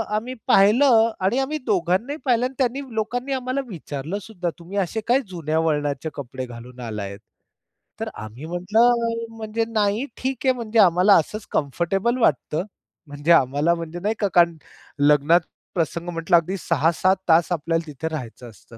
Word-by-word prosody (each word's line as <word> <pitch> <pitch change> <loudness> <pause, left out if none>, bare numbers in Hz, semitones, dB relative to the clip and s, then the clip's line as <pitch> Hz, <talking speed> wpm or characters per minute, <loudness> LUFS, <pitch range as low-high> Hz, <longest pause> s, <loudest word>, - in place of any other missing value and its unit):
आम्ही 235 +4 -3
पाहिलं 225 +3 +5
आणि 195 +7 +1
आम्ही 280 +3 -1
दोघांनाही 200 - 0
पाहिलं 245 -2 +2
आणि 255 - -4
त्यांनी 260 +1 0
लोकांनी 245 +5 -2
आम्हाला 260 +1 -2
विचारलंसुद्धा, 180 - -5
"तुम्ही 180 +4 -7
असे 200 +3 -1
काय 245 +3 +4
जुन्या 160 -4 -2
वळणाचे 145 -2 -1
कपडे 130 -2 -6
घालून 120 +1 -11
आलायेत?" 105 -4 -5 0.8
तर - - -3
आम्ही 110 +7 -9
म्हटलं, 230 +6 +1
"म्हणजे 220 +1 -2
नाही 215 +2 0
ठीक 260 -1 -2
आहे, 260 - +5
म्हणजे 230 -2 -1
आम्हाला 185 +1 +6
असंच 210 +6 0
कम्फर्टेबल 180 - 0
वाटतं." 155 - +1 0.4
म्हणजे 145 +3 -1
आम्हाला 145 +2 +4
म्हणजे 170 +1 -6
नाही 210 +4 -1
का 205 - +2
कारण 170 -1 +4 0.4
लग्नात 150 +4 +4 0.3
प्रसंग 170 0 -2
म्हटलं 170 +1 +1
अगदी 180 +4 -1
6-7 170 +4 +2
तास 165 +2 +4
आपल्याला 165 0 -1
तिथे 150 +2 -5
राहायचं 125 -5 -7
असतं. 115 +2 -16
175 Hz, 150 wpm, -23 LUFS, 155-225 Hz, 0.8 s, आम्हाला